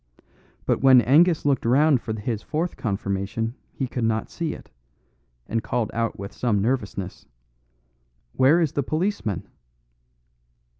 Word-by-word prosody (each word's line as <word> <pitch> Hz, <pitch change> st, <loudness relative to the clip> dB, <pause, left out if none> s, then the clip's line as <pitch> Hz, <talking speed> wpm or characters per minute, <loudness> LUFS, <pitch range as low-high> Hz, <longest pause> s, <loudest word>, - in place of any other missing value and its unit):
But -, -, +1 dB
when 130 Hz, -1 st, +8 dB
Angus 155 Hz, +7 st, +4 dB
looked 140 Hz, -3 st, +2 dB
round 135 Hz, +2 st, +4 dB
for 110 Hz, -1 st, -4 dB
his 110 Hz, 0 st, -3 dB
fourth 160 Hz, +7 st, -2 dB
confirmation 100 Hz, +1 st, -2 dB, 0.2 s
he 135 Hz, -, -3 dB
could 125 Hz, -1 st, -3 dB
not 110 Hz, -1 st, -1 dB
see 165 Hz, -2 st, -3 dB
it, -, -, -14 dB, 0.7 s
and 115 Hz, 0 st, -1 dB
called 115 Hz, -2 st, -2 dB
out 115 Hz, 0 st, -1 dB
with 100 Hz, +1 st, -7 dB
some 115 Hz, -5 st, 0 dB
nervousness, 100 Hz, -4 st, -3 dB, 1.1 s
"Where 140 Hz, +6 st, +4 dB
is 160 Hz, -5 st, +1 dB
the 140 Hz, -, -1 dB
policeman?" 155 Hz, -, -2 dB
120 Hz, 135 wpm, -24 LUFS, 110-145 Hz, 1.1 s, when